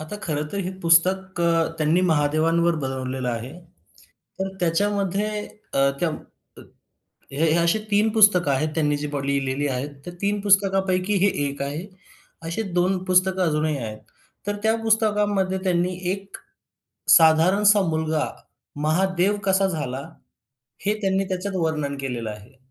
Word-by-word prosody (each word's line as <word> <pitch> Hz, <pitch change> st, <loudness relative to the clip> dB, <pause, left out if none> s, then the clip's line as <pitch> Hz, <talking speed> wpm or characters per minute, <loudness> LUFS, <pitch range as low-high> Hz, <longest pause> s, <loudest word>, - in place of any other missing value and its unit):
आता 155 Hz, +7 st, -7 dB
खरं 150 Hz, -2 st, -2 dB
तर, 200 Hz, -, -3 dB
हे 185 Hz, -1 st, -2 dB
पुस्तक 185 Hz, +2 st, +2 dB
अ, 165 Hz, -1 st, +2 dB
त्यांनी 155 Hz, +3 st, +2 dB
महादेवांवर 160 Hz, +3 st, +2 dB
बनवलेलं 130 Hz, -1 st, -3 dB
आहे. 120 Hz, +2 st, -4 dB, 0.9 s
तर 195 Hz, -, -1 dB
त्याच्यामध्ये, 200 Hz, +3 st, 0 dB, 0.5 s
अ, 135 Hz, 0 st, +3 dB
कम 160 Hz, -3 st, 0 dB, 1.2 s
हे 155 Hz, +3 st, +1 dB
अशे 170 Hz, +5 st, +2 dB
3 210 Hz, +2 st, +3 dB
पुस्तकं 200 Hz, -8 st, +5 dB
आहेत, 145 Hz, +4 st, 0 dB
त्यांनी 150 Hz, -2 st, +1 dB
जी 150 Hz, +1 st, -4 dB
बा 145 Hz, -1 st, -3 dB
लिहिलेली 140 Hz, 0 st, -1 dB
आहेत, 130 Hz, +2 st, -3 dB, 0.2 s
तर 175 Hz, -, -6 dB
3 205 Hz, +1 st, 0 dB
पुस्तकांपैकी, 195 Hz, -1 st, +2 dB
हे -, -, +5 dB, 0.2 s
एक 140 Hz, 0 st, -6 dB
आहे 150 Hz, +6 st, -4 dB, 0.6 s
अशे 170 Hz, +7 st, -2 dB
2 185 Hz, +2 st, +2 dB
पुस्तकं, 185 Hz, 0 st, +2 dB
अजूनही 150 Hz, -1 st, 0 dB
आहेत. 110 Hz, -4 st, -6 dB, 0.5 s
तर 205 Hz, 0 st, -1 dB
त्या 220 Hz, 0 st, +3 dB
पुस्तकामध्ये, 210 Hz, -4 st, +1 dB
त्यांनी 180 Hz, 0 st, +1 dB, 0.2 s
एक, 195 Hz, 0 st, -6 dB, 0.8 s
साधारणसा 185 Hz, +6 st, +5 dB
मुलगा, 160 Hz, -1 st, 0 dB, 0.6 s
महादेव 185 Hz, +4 st, +1 dB
कसा 195 Hz, 0 st, +2 dB
झाला, 135 Hz, -6 st, -3 dB, 0.9 s
हे 210 Hz, -, +2 dB
त्यांनी 195 Hz, 0 st, +1 dB
त्याच्यात 190 Hz, +1 st, -3 dB
वर्णन 155 Hz, -4 st, -1 dB
केलेलं 120 Hz, -5 st, -4 dB
आहे. 105 Hz, +5 st, -12 dB
170 Hz, 135 wpm, -23 LUFS, 150-195 Hz, 1.2 s, पुस्तकं